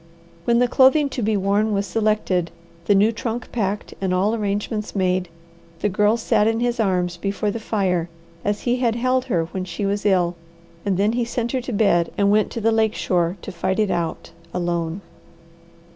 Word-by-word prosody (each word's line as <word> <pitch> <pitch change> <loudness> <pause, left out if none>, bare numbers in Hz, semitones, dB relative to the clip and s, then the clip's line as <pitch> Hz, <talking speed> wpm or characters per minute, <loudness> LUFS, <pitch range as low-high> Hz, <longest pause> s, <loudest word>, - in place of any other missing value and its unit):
When 235 0 +3
the 245 +1 +4
clothing 270 +4 +4
to 255 - -4
be 215 -1 +1
worn 200 +3 +1
was 200 0 0
selected, 210 -6 0 0.4
the 200 - +4
new 205 +3 +4
trunk 230 +1 -4
packed, 205 -3 -2
and 190 -1 0
all 200 +4 +2
arrangements 210 0 -2
made, 185 -2 0 0.5
the 210 - +2
Girl 210 +4 +2
sat 220 -2 +2
in 225 0 +1
his 240 0 0
arms 180 -4 0
before 200 +3 -1
the 230 - -4
fire 185 -6 0 0.3
as 205 0 -1
he 245 0 +1
had 235 -3 +1
held 255 +1 +1
her 165 -3 0
when 190 - -3
she 185 +3 -4
was 200 +1 -1
ill, 180 -4 +2 0.5
and 190 -2 +1
then 205 +2 +2
he 240 0 0
sent 235 0 -2
her 260 - -1
to 250 - -6
bed 200 -6 +2
and 200 0 +3
went 215 0 +3
to - - -5
the 225 +1 +3
lake 220 -1 +2
shore 175 0 0
to - - -6
fight 185 +2 -1
it 215 -3 +1
out 165 -2 -3 0.2
alone. 170 0 -2
205 Hz, 195 wpm, -22 LUFS, 185-225 Hz, 0.5 s, the